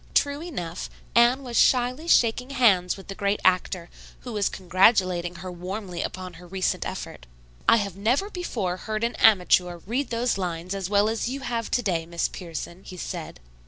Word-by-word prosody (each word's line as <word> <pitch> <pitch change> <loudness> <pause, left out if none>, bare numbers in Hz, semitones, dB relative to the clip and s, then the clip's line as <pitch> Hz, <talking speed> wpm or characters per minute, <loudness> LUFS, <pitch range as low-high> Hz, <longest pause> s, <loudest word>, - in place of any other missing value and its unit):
True 285 +1 +2
enough, 180 - -5 0.2
Anne 240 +3 +5
was 245 -2 -6
shyly 255 +5 +3
shaking 250 -3 +3
hands 200 -10 +3
with 195 - -12
the 195 - -5
great 200 +1 0
actor, 180 -1 +2 0.3
who 245 - -7
was 205 -2 +1
congratulating 185 -1 +2
her 180 +2 -7
warmly 180 0 -5
upon 185 -1 -5
her 180 - -12
recent 185 +1 -1
effort. - - -7 0.4
"I - - +8
have 200 -4 -2
never 250 - 0
before 215 - -3
heard 215 +2 -4
an 235 - 0
amateur 180 -4 +4
read 250 +6 -1
those 235 -2 0
lines 175 0 -3
as 195 -2 -3
well 205 0 +4
as 225 +2 -1
you 275 +2 -4
have 235 -3 -3
to 245 - +1
day, 170 -5 -1
Miss 170 0 -1
Pierson," 175 +1 -7
he 185 - -10
said. - - -6
200 Hz, 180 wpm, -25 LUFS, 180-240 Hz, 0.4 s, I